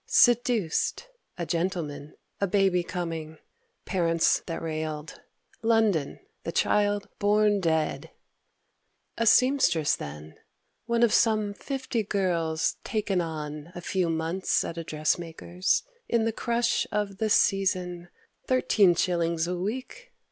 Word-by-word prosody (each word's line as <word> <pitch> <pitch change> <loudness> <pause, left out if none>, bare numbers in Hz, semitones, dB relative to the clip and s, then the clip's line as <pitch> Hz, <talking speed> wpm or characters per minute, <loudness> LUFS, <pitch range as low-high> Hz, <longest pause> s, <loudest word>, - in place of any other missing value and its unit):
Seduced; 240 - +2 0.3
a 175 - -3
gentleman; 165 -4 -3 0.2
a 200 - +1
baby 190 -1 +2
coming; 165 -3 -5 0.5
Parents 165 -3 +2
that 165 - -3
railed; 155 -1 -5 0.4
London; 220 -9 +1 0.2
the - - -3
child 205 -1 +1
born 205 0 +3
dead; 160 -4 0 1.1
A 230 - +2
seamstress 250 - +4
then, 75 +1 -9 0.5
one 235 0 +2
of 235 - +4
some 215 -2 +2
fifty 260 0 -3
girls 170 -6 0
"Taken 205 -4 -1
on" 155 -1 -6
a 175 - -6
few 180 0 0
months 165 +3 0
at - - -5
a - - -4
dressmaker's 165 +3 -1 0.3
In 230 -1 +2
the 225 - 0
crush 235 +1 0
of 205 -2 -2
the 220 - 0
"season;" 180 -4 +1 0.4
thirteen 210 -8 +4
shillings 170 -2 0
a 180 +1 -2
week! 260 - -5
180 Hz, 120 wpm, -27 LUFS, 165-215 Hz, 1.1 s, seamstress